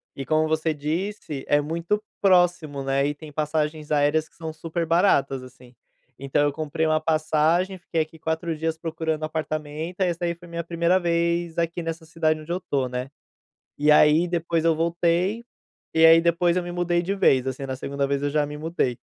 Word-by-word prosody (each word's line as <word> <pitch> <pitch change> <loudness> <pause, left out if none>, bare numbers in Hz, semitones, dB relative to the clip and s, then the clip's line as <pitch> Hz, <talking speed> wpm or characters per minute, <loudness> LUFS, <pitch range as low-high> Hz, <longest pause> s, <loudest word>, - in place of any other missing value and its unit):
e 135 - -5
como 155 +3 +2
você 160 +1 0
disse, 155 0 -4
é 145 - +4
muito 170 +7 -1 0.2
próximo, 175 -7 +3
né, 135 +1 +1
e 145 - -2
tem 150 0 -11
passagens 150 0 -2
aéreas 150 +1 +2
que - - -31
são 160 -1 -6
super 165 +1 -3
baratas, 160 -6 +2
assim. 125 -1 -15 0.5
Então 140 +2 +1
eu 145 - +2
comprei 160 +1 -2
uma 155 0 +2
passagem, 160 +4 +1
fiquei 165 -2 -1
aqui 155 +1 -6
4 160 +1 -2
dias 160 +1 -2
procurando 160 -1 -3
apartamento, 155 +3 -4
aí 180 - +3
essa 175 +1 -2
aí 170 0 -1
foi 175 +1 -15
minha 170 0 -4
1ª 170 +2 +1
vez 170 -1 0
aqui 170 +1 -1
nessa 165 0 -5
cidade 160 -1 0
onde 155 +2 -8
eu 175 - 0
estou, 140 -8 -1
né. 125 +1 -4 0.7
E 150 +1 +5
aí, 150 +3 +5
depois 170 -1 -1
eu 165 -1 +4
voltei, 170 +6 0 0.5
e 160 0 +6
aí 165 0 +8
depois 170 +1 +2
eu 180 - 0
me 175 - -6
mudei 175 0 0
de 185 +3 -2
vez, 130 -9 +3
assim. 130 +1 -4
Na 130 - -4
2ª 140 +1 -2
vez 140 0 -1
eu 145 - +1
já 150 0 +1
me 150 +1 -7
mudei. 150 -6 -1
160 Hz, 200 wpm, -24 LUFS, 150-170 Hz, 0.7 s, aí